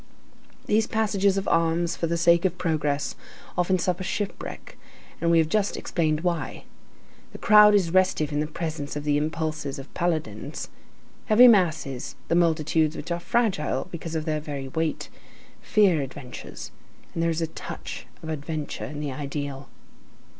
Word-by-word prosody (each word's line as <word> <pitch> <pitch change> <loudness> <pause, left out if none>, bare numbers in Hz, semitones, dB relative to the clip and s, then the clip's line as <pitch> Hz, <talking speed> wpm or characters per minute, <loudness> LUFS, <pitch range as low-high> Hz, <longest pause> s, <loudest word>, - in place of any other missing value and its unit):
These 215 +1 +2
passages 200 -3 +1
of 195 - -2
arms 165 +1 +2
for 165 - -1
the 170 +1 0
sake 170 0 +4
of 180 -2 0
progress 150 -5 -1 0.4
often 180 +1 +2
suffer 180 +1 -1
shipwreck, 200 +1 -5 0.5
and 170 - +2
we 170 - +5
have 160 -1 +4
just 205 +4 0
explained 155 -3 0
why. 170 -5 -2 0.7
The - - -7
crowd 210 0 +7
is 180 -5 +2
restive 185 -5 +2
in 145 - 0
the 150 - 0
presence 155 -2 -4
of 145 - -4
the 150 -1 +1
impulses 155 -1 -2
of 135 0 -10
paladins. 170 -3 -2 0.6
Heavy 240 +3 +8
masses, 160 - +2
the 170 - +3
multitudes 160 -2 +2
which - - -6
are 170 - 0
fragile 185 - 0
because 165 -1 -6
of 155 -1 -2
their 155 -2 0
very 140 -3 -6
weight, 160 +3 -2 0.5
fear 195 -8 +3
adventures; 130 -2 -8 0.4
and 165 - -2
there 165 - +2
is 165 0 -1
a - - +2
touch 160 - -8 0.2
of 160 - -6
adventure 155 -1 -4
in 150 0 -6
the 145 -2 -3
ideal. 140 0 -5
165 Hz, 160 wpm, -25 LUFS, 150-180 Hz, 0.7 s, Heavy